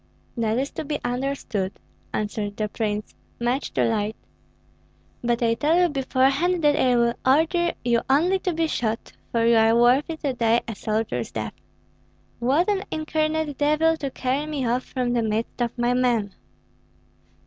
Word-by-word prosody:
"That 225 -2 0
is 275 +2 -1
to - - -5
be 295 0 -3
understood," 245 -6 -2 0.4
answered 205 -1 -3
the 215 - -1
prince. 210 0 -3 0.3
"Much 245 +3 -1
too - - +1
late! 215 -1 0 1.1
But 240 0 +1
I 230 -1 +3
tell 300 +8 +2
you 355 -1 +4
beforehand 275 +5 +1
that 295 -1 +5
I 255 -4 +3
will 235 0 +3
order 325 +6 +3
you 235 -1 +3
only 345 +8 +3
to 365 - -1
be 330 0 0
shot, 230 -7 -2 0.2
for 230 -1 +1
you 235 0 +5
are 225 +1 +5
worthy 270 +7 +3
to 285 -4 -2
die 230 -1 +2
a 225 - -3
soldier's 215 - -2
death. 110 -1 -4 0.9
What 275 +9 +2
an 405 -2 +1
incarnate 310 -1 -1
devil 305 +2 +3
to 280 -3 -3
carry 265 +3 -2
me 290 -4 -2
off 245 +2 0
from 250 -2 -2
the 240 - +2
midst 220 +2 -2
of 235 0 -1
my 240 +1 +2
men!" 240 -5 +1
250 Hz, 165 wpm, -24 LUFS, 230-300 Hz, 1.1 s, that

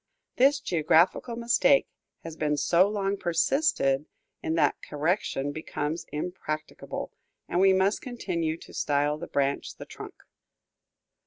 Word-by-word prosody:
This 275 +3 +5
geographical 175 - +2
mistake 240 +4 +3 0.4
has 165 -1 -7
been 150 -2 0
so 175 +6 +4
long 200 -1 -1
persisted 165 - +1 0.3
in 160 - -1
that 165 - +2
correction 150 -2 -1
becomes 155 +1 -4
impracticable, 155 -1 -5 0.4
and 175 - 0
we 195 0 +6
must 190 +2 +2
continue 170 -10 -3
to - - -14
style 145 +1 0
the 170 - -6
branch 140 0 -1
the - - -9
trunk. - - -10
170 Hz, 120 wpm, -27 LUFS, 150-200 Hz, 0.4 s, we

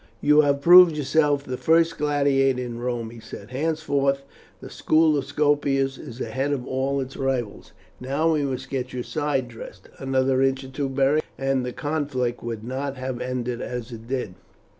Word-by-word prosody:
"You 150 +4 +5
have 140 -1 +1
proved 175 0 +8
yourself 145 0 +2
the 130 -2 -5
first 165 +2 +2
gladiator 140 -3 +2
in 120 -2 -5
Rome," 120 -2 -3
he 120 - -11
said. 110 0 -11
"Henceforth 140 -1 0 0.4
the - - -10
school 155 -1 +3
of 140 -2 -1
Scopus 140 -2 +1
is 120 - -10
ahead 135 +2 -2
of 125 -3 -3
all 135 +1 -1
its 135 0 -5
rivals. 130 -6 -3 0.3
Now 140 +6 0
we 150 - +1
must 135 -3 -4
get 130 -2 -3
your 125 -1 -3
side 145 -4 -1
dressed. 115 -1 -11
Another 130 0 +1
inch 135 0 +1
or 130 - -9
two, 135 +1 -3
Beric, 140 +3 +2
and 135 -1 0
the 125 - -3
conflict 140 -5 -2
would 115 -2 -5
not 135 +3 -4
have 130 -1 -4
ended 125 -1 -3
as 125 -1 -5
it 115 -1 -10
did." 125 -7 -3
135 Hz, 180 wpm, -24 LUFS, 125-145 Hz, 0.4 s, proved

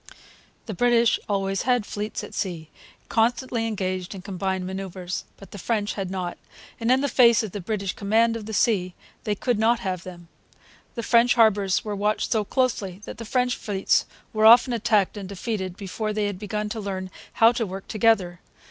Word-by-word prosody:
The 220 - -5
British 235 +2 +3
always 195 -1 0
had 245 -4 +1
fleets 210 +1 -4
at - - -9
sea, 170 -6 -4 0.4
constantly 230 0 0
engaged 185 -3 -3
in 185 - -9
combined 190 -1 -3
manoeuvres. 185 -1 -5
The 195 +1 -11
French 210 +1 -1
had 195 -3 -4
not; 185 -2 -4 0.4
and, 230 0 -1
in 265 +2 +3
face 235 -3 +5
of 215 - -5
the 205 - -5
British 195 0 -3
command 225 +3 +2
of 220 -2 -6
the - - -5
sea, 190 -4 +1 0.3
they 210 - 0
could 240 +1 -1
not 230 +1 +3
have 185 -2 -3
them. 175 -2 -11 0.7
The 235 - -4
French 235 +1 +4
harbours 205 -5 +3
were 210 -1 -3
watched 210 +1 -1
so 220 -2 +2
closely 205 -5 -1
that - - -9
the 230 - -6
French 250 +1 +1
fleets 195 -2 0 0.3
were 215 0 +5
often 240 +2 +7
attacked 215 -3 +1
and 195 -2 -7
defeated 195 -2 -4
before 215 +2 -4
they 210 0 0
had 200 -2 -3
begun 210 0 -3
to 220 - -4
learn 190 -2 -5 0.2
how 225 +1 +6
to 240 -1 -2
work 190 +1 -7
together. 205 -6 +2
210 Hz, 185 wpm, -24 LUFS, 190-230 Hz, 0.7 s, often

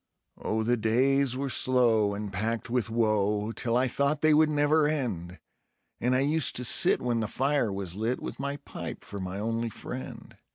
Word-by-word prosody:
Oh, 110 +1 -1
the 120 +2 +1
days 130 +4 +2
were 135 0 -1
slow 115 -6 +3
and 100 -1 -5
packed 115 +4 -2
with 120 -4 0
woe, 105 -2 +1
till 115 0 -1
I 130 +1 +2
thought 140 +4 0
they 155 -1 +5
would 155 +1 +5
never 150 +1 +3
end; 100 - -3 0.6
And 125 +2 +1
I 130 - +3
used 150 +2 0
to 125 - -3
sit 120 - +3
when 120 -2 0
the 110 - -1
fire 135 -2 0
was 95 -3 -4
lit, 115 +4 -1
with - - -7
my 140 +1 -3
pipe 140 - -8
for 100 - -7
my 95 0 -5
only 115 +2 -2
friend. 130 +3 -8
120 Hz, 190 wpm, -28 LUFS, 110-135 Hz, 0.6 s, they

